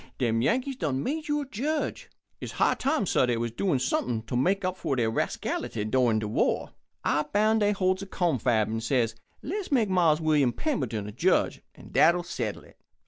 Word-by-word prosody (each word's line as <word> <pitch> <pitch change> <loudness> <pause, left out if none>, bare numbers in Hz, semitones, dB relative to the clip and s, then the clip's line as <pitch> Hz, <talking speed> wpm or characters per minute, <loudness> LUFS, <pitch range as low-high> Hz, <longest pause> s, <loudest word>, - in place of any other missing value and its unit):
Dem 115 -3 +1
Yankees 255 - 0
done 140 - -1
made 310 +3 -3
you 295 0 0
er - - -5
judge? 285 +5 -3 0.3
It's - - -7
high - - +3
time, 280 -4 0
sah, 130 - +2
dey 120 -1 +1
was 115 0 -2
doin' 160 - 0
somep'n 120 -2 -1
to 120 - -4
make 185 +10 +1
up 185 0 -1
for 140 -7 -2
dey 120 -3 +1
rascality 110 0 -2
endurin' 115 +1 +2
de 110 -1 -2
war. 105 - 0 0.3
I 145 - +2
boun' 215 +2 +3
dey 205 -1 +3
holds 185 -1 +1
a 195 - -6
confab 125 - +1
and 110 +1 -3
says: 115 -1 +1 0.3
'Le's 380 +4 -4
make 235 -7 +3
Mars 170 -5 +3
William 150 -6 +2
Pemberton 125 - -2
er - - -6
judge, - - +1
and - - -14
dat'll 175 +1 +4
settle 120 -11 -4
it.' - - -20
155 Hz, 195 wpm, -27 LUFS, -, 0.3 s, dat'll